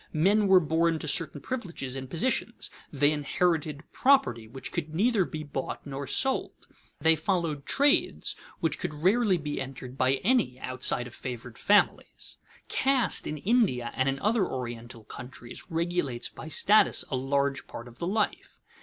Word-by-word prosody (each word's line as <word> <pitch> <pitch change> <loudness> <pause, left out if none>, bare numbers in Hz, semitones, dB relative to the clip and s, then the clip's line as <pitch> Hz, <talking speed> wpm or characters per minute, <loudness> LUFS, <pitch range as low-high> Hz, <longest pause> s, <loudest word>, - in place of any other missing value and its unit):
Men 200 +6 +3
were 190 -1 +7
born 165 0 +1
to 155 - -6
certain 145 -1 +1
privileges 170 - -4
and 130 -1 -6
positions; 235 - -1 0.2
they 145 0 +3
inherited 155 0 0
property 255 - +3
which 130 +4 -7
could 155 -2 -4
neither 210 0 +3
be 155 -2 -6
bought 145 -2 -5
nor 140 -1 -5
sold; 265 0 -1 0.3
they 160 0 +5
followed 160 -3 -1
trades 285 +1 +2 0.3
which 160 -3 0
could 165 -4 -4
rarely 205 0 +4
be 150 -3 -4
entered 130 -1 -7
by 130 +1 +4
any 210 - +2
outside 130 -1 0
of 120 - -10
favored 120 -2 -7
families. 205 0 +1 0.3
Caste 265 -3 +1
in 155 - -3
India 185 - +1
and 130 +1 +1
in 135 - -1
other 215 - +2
Oriental 120 -2 -6
countries 120 +1 -9
regulates 165 -7 -1
by - - -10
status 210 +6 +4
a - - +1
large 140 +1 0
part 120 - -8
of 120 0 -15
the 170 - -2
life. 210 +3 -1
155 Hz, 155 wpm, -28 LUFS, 130-190 Hz, 0.3 s, were